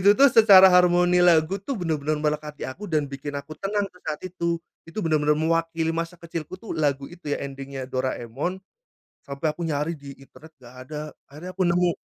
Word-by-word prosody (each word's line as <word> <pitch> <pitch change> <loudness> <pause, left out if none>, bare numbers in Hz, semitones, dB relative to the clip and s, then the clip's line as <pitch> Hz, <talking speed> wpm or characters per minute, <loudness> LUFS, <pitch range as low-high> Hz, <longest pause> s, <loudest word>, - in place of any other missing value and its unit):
itu 195 - +4
tuh 280 +1 +7
secara 190 -4 +8
harmoni 180 0 +4
lagu 175 +2 +4
tuh 255 +7 -4
bener-bener 155 -5 -1
melekat 150 0 -2
di - - -7
aku 185 +11 -7
dan 155 -3 +1
bikin 140 +1 -5
aku 140 +2 -7
tenang 205 +1 0
tuh 180 - -20
saat 150 - -3
itu, 170 -2 -2 0.3
itu 165 - -9
bener-bener 150 -2 +2
mewakili 165 +1 0
masa 165 +1 -4
kecilku 170 0 -7
tuh 220 - -8
lagu 145 -4 0
itu 175 -4 -10
ya - - -2
ending-nya 135 -1 -7
Doraemon, 130 +5 -3 0.7
sampai 140 +3 -3
aku 150 - -15
nyari 150 +2 -1
di 140 -1 -11
internet 155 +3 -17
gak 125 -1 -16
ada 150 -1 -5 0.3
akhirnya 155 +6 -9
aku 185 0 0
nemu. 175 0 +3
160 Hz, 190 wpm, -24 LUFS, 145-180 Hz, 0.7 s, secara